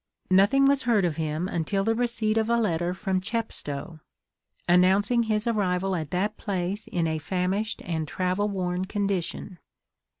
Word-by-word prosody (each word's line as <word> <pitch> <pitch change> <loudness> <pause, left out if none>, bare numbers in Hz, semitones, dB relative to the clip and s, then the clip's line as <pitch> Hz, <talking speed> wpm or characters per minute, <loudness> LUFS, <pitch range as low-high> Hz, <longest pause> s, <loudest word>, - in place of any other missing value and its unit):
Nothing 200 +9 +5
was 275 0 +4
heard 230 -6 +2
of 165 -4 -1
him 160 +2 -2
until 190 +3 -1
the 225 +2 +2
receipt 230 -2 0
of 225 0 +1
a 235 - +3
letter 175 -5 0
from 190 -1 -1
Chepstow, 175 -8 -3 0.7
announcing 190 +7 +4
his 215 -1 0
arrival 195 -4 0
at 155 -4 -4
that 200 +6 -1
place 195 0 -3
in 170 -2 -1
a 160 -1 -1
famished 190 +6 -2
and 160 -3 -2
travel 185 +5 -1
worn 185 -2 -2
condition. 195 -2 -3
190 Hz, 155 wpm, -26 LUFS, 175-215 Hz, 0.7 s, Nothing